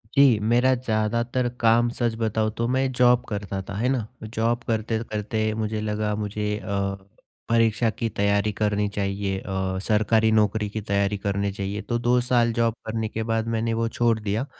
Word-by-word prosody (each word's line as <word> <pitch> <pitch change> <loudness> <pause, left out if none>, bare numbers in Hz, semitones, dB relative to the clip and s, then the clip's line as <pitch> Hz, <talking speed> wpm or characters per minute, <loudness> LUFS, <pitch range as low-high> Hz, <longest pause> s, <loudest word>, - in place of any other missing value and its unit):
जी, 135 -6 +6
मेरा 120 +4 +3
ज़्यादातर 120 +1 0
काम, 115 +1 +4
सच 120 -2 -1
बताऊँ 110 -1 0
तो 115 0 0
मैं 130 +1 +1
जॉब 125 0 +4
करता 100 -2 -3
था, - - -4
है 125 +4 +1
ना? 120 -5 -1 0.2
जॉब 115 +2 -1
करते-करते 110 -1 -1
मुझे 110 0 -2
लगा 105 0 -1
मुझे 105 0 -2
अ, 100 -1 -2 0.5
परीक्षा 115 0 +3
की 115 +1 -3
तैयारी 100 +1 +1
करनी 105 0 +1
चाहिए 100 -1 -1
अ, 95 -1 -3
सरकारी 110 +1 +3
नौकरी 105 -1 +2
की 110 +1 -4
तैयारी 100 0 0
करनी 100 0 -1
चाहिए, 100 +1 -4
तो 120 0 -2
2 120 +1 +3
साल 120 -2 +2
जॉब 115 -1 +1
करने 110 0 -2
के 110 +1 -4
बाद 115 0 -1
मैंने 115 0 0
वो 115 0 0
छोड़ 115 -1 +1
दिया 105 +5 -2
110 Hz, 175 wpm, -24 LUFS, 105-115 Hz, 0.5 s, जी